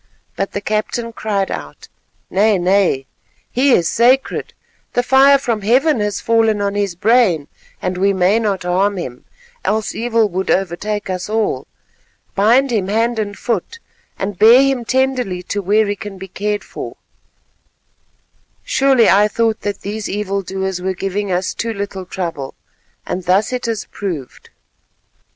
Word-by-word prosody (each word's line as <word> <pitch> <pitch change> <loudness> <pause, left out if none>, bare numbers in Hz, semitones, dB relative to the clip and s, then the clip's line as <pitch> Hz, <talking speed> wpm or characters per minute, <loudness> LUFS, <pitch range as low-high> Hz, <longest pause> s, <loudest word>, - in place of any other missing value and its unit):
But 195 - -3
the 200 - -3
captain 215 +3 -2
cried 200 -3 -1
out, 75 -2 -7 0.4
"Nay, 205 +2 +3
nay, 180 -6 +2 0.5
he 265 +3 +3
is 170 -6 +3
sacred; 255 +3 +2 0.4
the 245 - +1
fire 270 +2 +6
from 235 -5 -2
Heaven 255 +6 +3
has 210 -1 -1
fallen 225 -2 +2
on 200 0 -1
his 200 -3 -1
brain, 195 - +3 0.4
and 180 0 -2
we 200 +1 +3
may 190 +3 +3
not 200 -5 -1
harm 190 +3 +1
him, 125 -8 -6 0.4
else 220 0 -1
evil 230 -1 +1
would 190 +1 -3
overtake 195 +3 -1
us 185 +1 -4
all. 220 0 -1 0.7
Bind 240 +7 +3
him 205 -5 0
hand 225 +3 0
and 205 -1 -3
foot, 235 - -3 0.4
and 195 -1 -4
bear 235 +5 +8
him 270 -3 0
tenderly 255 -8 0
to 205 +3 -3
where 210 +3 +3
he 205 0 -1
can 205 -2 -8
be 190 +1 -8
cared 205 +2 -2
for. - - -8 1.7
Surely 270 - +3
I 205 +2 +5
thought 225 +1 0
that 205 -1 -3
these 210 +1 -4
evil 200 -1 -2
doers 190 -1 -3
were 190 +1 -2
giving 195 +2 -2
us 180 +1 -1
too 230 -1 -3
little 200 -2 -5
trouble, 165 -8 -5 0.5
and 180 0 -4
thus 195 +7 +2
it 250 -1 -2
has 225 -3 -2
proved." 165 -11 -6
205 Hz, 155 wpm, -18 LUFS, 190-230 Hz, 1.7 s, bear